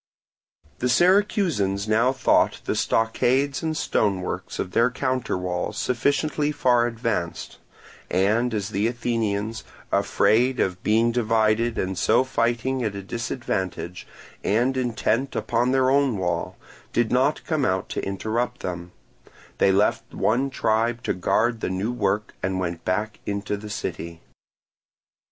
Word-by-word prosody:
The 125 - 0
Syracusans 175 - +2
now 115 +4 +3
thought 130 -1 +2
the - - 0
stockades 130 +5 +1
and 160 -1 -2
stonework 95 -10 -1
of 90 - -3
their 115 +4 +3
counterwall 115 -9 -2
sufficiently 145 +4 0
far 120 -4 +3
advanced; 115 -7 -3 0.5
and 110 +7 +2
as 105 -3 -2
the 100 +3 0
Athenians, 115 -3 -2 0.3
afraid 110 +5 +2
of 90 -1 0
being 115 +2 +3
divided 115 0 +1
and 95 0 -1
so 115 +7 +3
fighting 125 0 0
at 105 -3 -2
a 100 - -6
disadvantage, 95 -6 -4 0.4
and 120 +6 +2
intent 125 +1 0
upon 120 +1 0
their 130 0 +3
own 140 -5 +2
wall, 85 -2 -2 0.3
did 120 -2 +1
not 130 +4 +2
come 155 -4 0
out 95 -6 0
to - - -3
interrupt 115 +5 -2
them, 90 -1 -5 0.7
they 95 - +5
left 105 +4 +1
one 130 +5 +1
tribe 115 -1 0
to - - 0
guard 115 +6 +1
the - - -2
new 95 +5 -1
work 105 -2 -1
and 95 0 -1
went 85 -2 -3
back 105 +3 -2
into 100 0 -2
the 105 +1 -8
city. 85 -4 -5
115 Hz, 135 wpm, -24 LUFS, 100-125 Hz, 0.7 s, they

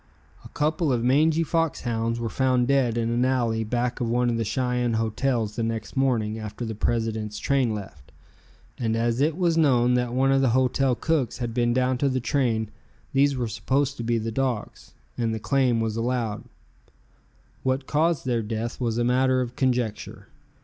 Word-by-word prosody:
A - - -12
couple 155 0 0
of 120 -2 0
mangy 155 +6 +3
fox 165 -1 0
hounds 115 -1 -1
were 120 - -2
found 125 +1 +1
dead 130 -4 +2
in 115 0 0
an 120 +1 +1
alley 120 -4 +1
back 120 +3 -2
of 120 - 0
one 120 +1 +1
of 115 - -1
the 115 - 0
Cheyenne 125 +2 -1
hotels 110 0 -1
the - - -2
next 115 +1 -3
morning 115 -5 0
after 110 +2 -6
the 110 - -4
president's 110 -1 -2
train 130 -6 +1
left, 75 -10 -10 0.7
and 115 -2 0
as 115 +2 0
it 155 +2 +1
was 170 -3 +2
known 125 -5 +4
that 125 -1 0
one 135 +1 +3
of 135 0 +3
the 130 - +3
hotel 130 0 +2
cooks 140 -5 -1
had 120 -2 -4
been 120 0 +1
down 125 +1 +1
to 140 - +2
the 130 0 0
train, 120 -5 0 0.4
these 140 0 +3
were 120 -2 -1
supposed 135 +5 -1
to 120 - -4
be 115 0 +1
the 115 0 -3
dogs, 125 -2 -3 0.2
and 115 -2 0
the - - -4
claim 130 -1 +1
was 110 -1 -1
allowed. 115 -2 -2 1.2
What 130 +1 -1
caused 160 +1 +1
their 120 -3 0
death 115 +3 -4
was 115 -2 -1
a 120 - +1
matter 130 +1 +2
of 125 -1 -3
conjecture. 125 -6 -2
120 Hz, 190 wpm, -25 LUFS, 115-135 Hz, 1.2 s, known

